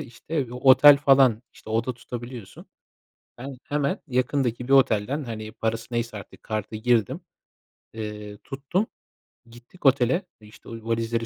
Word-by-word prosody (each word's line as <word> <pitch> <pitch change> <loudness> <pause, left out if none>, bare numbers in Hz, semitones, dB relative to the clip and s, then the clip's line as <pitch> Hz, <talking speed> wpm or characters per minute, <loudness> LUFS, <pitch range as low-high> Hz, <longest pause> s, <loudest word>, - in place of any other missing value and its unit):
işte, 140 +2 -4
otel 135 +3 +7
falan, 135 -5 +4
işte, - - -13
oda 115 +3 -1
tutabiliyorsun. 120 -2 -9 0.7
Ben, 135 +2 -8
hemen 145 -1 -1
yakındaki 125 -2 -1
bir 135 - +2
otelden, 135 +2 +3
hani, 110 -3 -6
parası 115 0 -3
neyse 115 -2 -2
artık 100 - -13
kartı 110 0 -4
girdim, 120 - +1 0.7
eee, 105 -2 -7
tuttum. 145 +10 -2 0.6
Gittik 120 +9 -17
otele, 135 +7 +3 0.2
işte, 105 0 -15
o - - -8 0.2
valizleri 115 0 -1
120 Hz, 130 wpm, -25 LUFS, 110-135 Hz, 0.7 s, otel